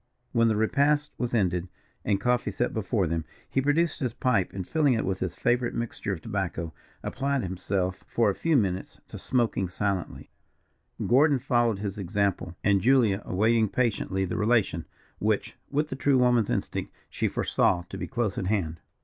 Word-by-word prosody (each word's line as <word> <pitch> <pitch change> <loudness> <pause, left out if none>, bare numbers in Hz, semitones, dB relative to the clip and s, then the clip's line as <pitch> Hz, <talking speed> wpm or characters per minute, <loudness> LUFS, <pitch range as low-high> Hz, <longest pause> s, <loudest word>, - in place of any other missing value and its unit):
When 115 -2 +3
the 110 - +2
repast 145 +7 +2
was 120 -1 -1
ended, 90 -4 +1 0.3
and 100 -2 +1
coffee 125 +4 +1
set 120 - -1
before 110 -2 0
them, 80 0 -1 0.2
he 135 - 0
produced 155 +5 +1
his 125 -6 -2
pipe, 115 -8 +1
and 95 -2 -5
filling 150 -5 +3
it 110 - -1
with 95 0 -1
his 90 -3 -3
favourite 120 +5 +1
mixture 115 -3 -3
of 90 -5 -4
tobacco, 90 -6 -3 0.3
applied 140 -1 -1
himself 95 0 -2
for 115 - +2
a 100 - +3
few 165 +5 +2
minutes 95 -5 -1
to - - -8
smoking 115 -7 0
silently, 95 -1 -3 0.7
Gordon 140 +4 +5
following 120 -4 +1
his 100 0 -4
example, 95 -2 -1
and 100 -1 +3
Julia 115 -5 +4
awaiting 110 +3 +2
patiently 100 -5 0
the 90 - -3
relation, 105 -7 +1 0.3
which, - - 0
with 150 +2 0
the 130 - -3
true 135 0 +3
woman's 125 -3 +3
instinct, - - -2 0.2
she - - -1
foresaw 85 -1 +1
to - - -7
be - - -4
close 120 -6 -1
at 90 - -2
hand. 85 -6 -1
110 Hz, 175 wpm, -27 LUFS, 95-125 Hz, 0.7 s, Gordon